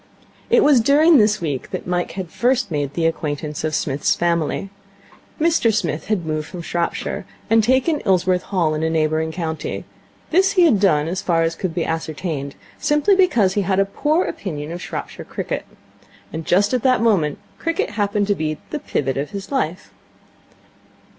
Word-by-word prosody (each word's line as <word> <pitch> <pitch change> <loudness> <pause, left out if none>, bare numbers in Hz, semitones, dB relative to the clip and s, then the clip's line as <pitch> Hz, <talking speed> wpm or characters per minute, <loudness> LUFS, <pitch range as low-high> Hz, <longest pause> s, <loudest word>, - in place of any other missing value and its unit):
It 470 -1 +5
was 290 -4 +6
during 295 +5 +5
this 210 0 +3
week 145 -6 -3
that - - -5
Mike 175 0 -1
had 185 -4 -6
first 245 -3 +1
made 145 -2 -2
the 165 - 0
acquaintance 150 -2 -2
of 155 -1 -1
Psmith's 140 -1 0
family. 170 +3 -1 0.7
Mr 315 -8 +3
Smith 165 -8 -2
had 200 -5 -1
moved 155 -1 -2
from 180 -2 -8
Shropshire, 170 +1 -2 0.3
and 225 -1 +5
taken 260 +6 +2
Ilsworth 185 -1 +2
Hall 170 -6 +1
in 155 - -2
a 160 - +1
neighbouring 160 0 0
county. 160 -2 -4 0.5
This 380 +4 +4
he 365 -3 +5
had 255 - +4
done, 155 -6 +3
as 180 +3 -2
far 165 -2 +1
as 165 0 0
could 170 -1 -4
be 170 - 0
ascertained, 155 -3 -3 0.2
simply 300 +6 +3
because 240 - +3
he 205 - +1
had 190 0 +1
a 195 - +4
poor 305 - 0
opinion 155 -5 -5
of 175 +1 -6
Shropshire - - -6
cricket. - - -4 0.7
And 160 0 -5
just 200 +6 +3
at 250 - +1
the 255 0 +4
moment 195 -10 +2 0.2
cricket 330 -8 -1
happened 205 0 0
to 205 - +2
be 155 -4 -2
the 300 - -2
pivot 135 - -2
of 140 +2 -2
his 200 +2 -7
life. 185 - -2
185 Hz, 180 wpm, -21 LUFS, 160-230 Hz, 0.7 s, was